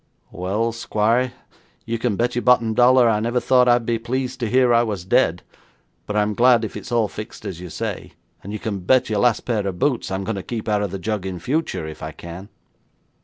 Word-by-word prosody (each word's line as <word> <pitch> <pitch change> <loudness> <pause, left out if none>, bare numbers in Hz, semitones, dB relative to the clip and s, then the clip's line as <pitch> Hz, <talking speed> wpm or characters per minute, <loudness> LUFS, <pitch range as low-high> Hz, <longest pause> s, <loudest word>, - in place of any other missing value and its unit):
'Well, 105 +6 -1
squire, 115 +2 0 0.5
you 115 0 -2
can 115 -3 0
bet 120 +4 0
your 120 - -1
bottom 120 -3 +3
dollar 125 +1 +5
I 110 -2 +2
never 120 +3 0
thought 125 0 +3
I'd 120 -1 +3
be 115 -1 0
pleased 130 +2 -3
to 115 -3 -2
hear 125 0 +4
I 115 - +5
was 105 -7 -3
dead, 95 - +2 0.6
but 105 - -3
I'm 105 0 +1
glad 120 0 +4
if - - -8
it's 130 - -8
all 115 -3 +2
fixed 105 +1 -9
as 90 -3 -5
you 90 0 -8
say, - - -5 0.3
and 100 - -7
you 105 - -3
can 105 -2 -4
bet 115 +6 +2
your 105 - +1
last 115 +1 +3
pair 110 -5 -1
of 95 -2 -4
boots 125 +2 0
I'm 95 +1 -3
going 105 +1 -3
to - - -3
keep 115 +3 -5
out 105 -1 +1
of 100 - -1
the 95 - -5
jug 95 +1 -3
in 95 -1 -4
future 130 - -2
if 80 0 -9
I 80 0 -6
can.' 85 +5 -10
110 Hz, 230 wpm, -22 LUFS, 100-120 Hz, 0.6 s, dollar